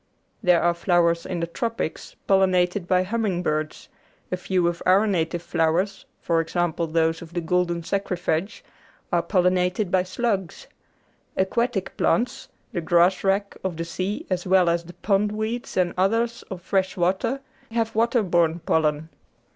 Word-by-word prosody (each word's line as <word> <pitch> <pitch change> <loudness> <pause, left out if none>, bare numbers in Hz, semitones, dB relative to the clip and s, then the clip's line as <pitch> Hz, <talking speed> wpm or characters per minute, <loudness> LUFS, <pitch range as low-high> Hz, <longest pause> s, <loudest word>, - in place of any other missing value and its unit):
There 180 -2 +4
are 175 0 +3
flowers 170 -1 +2
in 175 -2 -3
the - - +1
Tropics 225 0 -4
pollinated 185 -1 +2
by 185 0 +3
humming 195 -3 -1
birds; 155 -2 -2 0.4
a - - +1
few 180 -1 0
of 170 0 -2
our 190 +4 +4
native 175 -4 -1
flowers, 170 +4 0
for 165 -1 +1
example 170 0 -1
those 165 +1 +1
of 170 +1 -11
the - - +1
golden 175 0 0
saxifrage, 185 0 -2 0.5
are - - +4
pollinated 180 +1 +1
by 185 - +4
slugs; 190 -1 -2 0.7
aquatic 205 +1 0
plants, 240 +1 0 0.3
the 175 - -1
grasswrack 190 +4 +2
of 185 -4 -3
the 165 - -3
sea 185 +4 -3
as 185 -1 -2
well 185 -2 +4
as 170 0 -1
the 175 - -11
pondweeds 215 +3 -1
and 180 -2 +2
others 230 +5 +1
of 180 -3 -7
fresh 190 0 0
water, 190 +9 0 0.3
have 225 -1 -1
water 230 +1 +2
borne 170 -3 +2
pollen. 155 0 0
180 Hz, 145 wpm, -24 LUFS, 170-200 Hz, 0.7 s, There